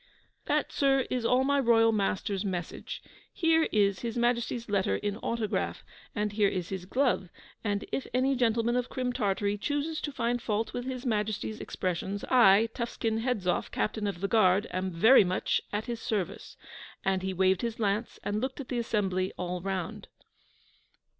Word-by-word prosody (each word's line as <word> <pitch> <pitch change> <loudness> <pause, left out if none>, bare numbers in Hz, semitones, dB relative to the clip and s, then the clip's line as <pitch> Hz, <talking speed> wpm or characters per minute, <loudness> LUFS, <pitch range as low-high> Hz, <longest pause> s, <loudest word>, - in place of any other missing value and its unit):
'That, - - +1
sir, 270 -2 +2
is 250 -2 0
all 250 +2 +4
my 280 +1 +2
royal 225 -3 +5
master's 200 -1 -1
message. 180 -4 -5 0.3
Here 325 -1 +3
is 200 -3 +2
His 230 +2 -4
Majesty's 240 0 0
letter 200 -1 +1
in 205 0 -2
autograph, 230 -2 -2 0.3
and 210 -1 0
here 205 -1 +3
is 180 -3 -3
his 190 -2 -5
glove, 245 -6 +1 0.3
and 205 -2 -1
if 270 - -2
any 260 +3 +2
gentleman 235 -1 +2
of 250 0 -1
Crim 250 -2 -2
Tartary 205 -3 0
chooses 290 +5 -2
to 295 - -3
find 240 -2 -1
fault 220 +1 -1
with 245 - -4
His 255 0 -5
Majesty's 215 -1 -1
expressions, 185 +2 -3
I, 225 -3 +6
Tuffskin 225 -2 -2
Hedzoff, 220 -7 0
Captain 215 -1 -1
of 190 -3 -4
the 200 - +1
Guard, 200 -1 +4
am 185 +1 -2
very 210 +9 +6
much 185 0 0
at 210 +1 -2
his 235 -2 -4
service,' 205 -5 -3 0.5
and 190 -1 +1
he 190 0 -2
waved 190 0 +2
his 230 -1 -3
lance, 210 +2 -1
and 210 +1 -1
looked 260 +2 -3
at 265 - -7
the 245 - -1
assembly 190 -5 0
all 180 0 -3
round. 190 -2 -4
215 Hz, 170 wpm, -29 LUFS, 195-245 Hz, 0.5 s, I